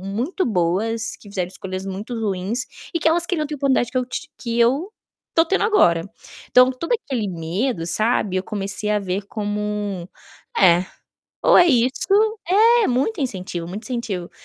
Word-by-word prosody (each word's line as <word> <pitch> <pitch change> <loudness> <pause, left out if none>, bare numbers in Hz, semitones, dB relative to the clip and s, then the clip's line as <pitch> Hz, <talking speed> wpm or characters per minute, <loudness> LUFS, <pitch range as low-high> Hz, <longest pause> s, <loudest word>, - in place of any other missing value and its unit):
muito 230 - -2
boas 215 +3 0
que 205 - -16
fizeram 185 -3 -3
escolhas 185 0 -6
muito 200 +5 -5
ruins 210 +3 -2 0.3
e 335 - 0
que 320 - +3
elas 340 +1 +2
queriam 330 -4 -1
ter 300 - -5
a - - -5
oportunidade 265 -4 +1
que 255 - 0
eu 255 - 0
t 335 +6 -6
que 235 -1 -2
eu 270 - +2 0.4
estou 325 - +4
tendo 390 +4 +1
agora". 175 - +4 0.5
Então, 250 +1 +6
todo 330 - -4
aquele 255 - -1
medo, 175 +4 -2
sabe, 210 +1 +1
eu 185 - -1
comecei 200 0 -3
a 210 0 +2
ver 190 +1 -2
como 205 -3 -3 0.5
é, 180 -1 +5 0.6
ou - - +7
é 355 - +7
isso 250 -3 +4 0.9
é - - +3
muito 280 - 0
incentivo, 185 -8 -4
muito 205 +5 -6
incentivo. 215 -8 -4
215 Hz, 170 wpm, -21 LUFS, 190-255 Hz, 0.9 s, ou